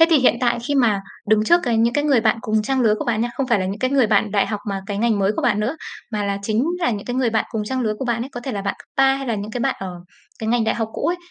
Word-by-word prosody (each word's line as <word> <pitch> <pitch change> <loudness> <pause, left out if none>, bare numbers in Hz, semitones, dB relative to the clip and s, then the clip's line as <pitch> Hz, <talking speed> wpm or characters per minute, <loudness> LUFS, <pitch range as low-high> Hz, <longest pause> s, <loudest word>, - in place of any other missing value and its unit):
Thế 325 - +8
thì 320 - +6
hiện 255 - +4
tại 240 -1 +2
khi 290 - +1
mà 225 -7 +3 0.3
đứng 215 0 +4
trước 345 +8 +5
cái 240 -3 0
những 235 +1 +2
cái 290 - +1
người 275 -6 +4
bạn 220 +1 +2
cùng 215 -2 0
trang 265 +3 0
lứa 220 -3 +4
của - - -3
bạn 225 -2 0
nha, 240 - 0
không 270 - -1
phải 235 -5 +2
là 185 - -1
những 195 +2 -4
cái 255 +3 0
người 270 -4 +4
bạn 210 0 +2
đại 200 -1 +2
học 210 -2 -3
mà 195 -1 -2
cái 205 -1 -3
ngành 225 -2 +2
mới 195 +1 +2
của - - -1
bạn 210 -4 +2
nữa, 245 +9 -1 0.4
mà 210 -1 -1
là 200 0 -1
chính 220 +4 +1
là 335 - +1
những 205 -3 -4
cái 245 - -3
người 255 -3 +2
bạn 220 -1 +1
cùng 215 -2 -2
trang 260 +4 -2
lứa 215 -3 0
của - - -3
bạn 235 -1 -1
ấy, 260 - -6
có 245 - -6
thể 260 +1 -5
là 200 -2 -3
bạn 200 - -1
cấp - - -16
ba 270 0 +5
hay 270 0 -5
là 230 - 0
những 205 +1 -5
cái 240 +2 -4
bạn 270 +2 +1
ở 190 -1 -5 0.5
cái 220 - -3
ngành 235 -1 +2
đại 220 - +1
học 225 -2 -2
cũ - - -2
ấy, 350 - +1
230 Hz, 355 wpm, -21 LUFS, 210-255 Hz, 0.5 s, Thế